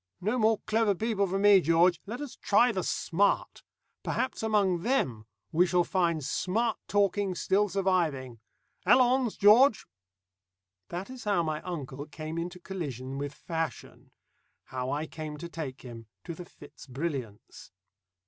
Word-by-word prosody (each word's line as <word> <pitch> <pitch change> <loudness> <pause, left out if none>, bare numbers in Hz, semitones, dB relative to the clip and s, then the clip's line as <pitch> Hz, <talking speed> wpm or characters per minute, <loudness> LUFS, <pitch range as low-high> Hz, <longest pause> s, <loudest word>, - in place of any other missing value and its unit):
No 215 +7 -1
more 220 0 +3
clever 220 -2 +2
people 210 0 0
for 190 +2 -1
me, 200 -1 +6
George. 170 +2 +3
Let 240 +6 -5
us 290 -4 -7
try 240 +4 +3
the 190 -4 -2
smart. 195 +3 0 0.4
Perhaps 260 - -2
among 205 -5 +1
them 130 - -1 0.2
we 175 +3 +3
shall 175 0 +3
find 170 -6 0
smart 220 - -1
talking 200 -1 +1
still 205 +3 +1
surviving. 165 - 0 0.4
Allons, 255 -2 +3
George!" 220 +4 +6 1.0
That 185 +7 -5
is 255 -3 -9
how 200 -5 +2
my 155 -1 -2
uncle 145 -5 -6
came 155 +2 -6
into 175 +2 -5
collision 135 -8 -5
with 145 0 -3
fashion, 165 -2 -5 0.5
how 130 0 -4
I 150 +3 -1
came 155 -1 -7
to 170 +3 -7
take 150 -6 -7
him 115 -3 -10 0.2
to 170 - -6
the 175 +2 -9
Fitz - - -15
Brilliants. 130 -6 -6
180 Hz, 145 wpm, -29 LUFS, 155-205 Hz, 1.0 s, me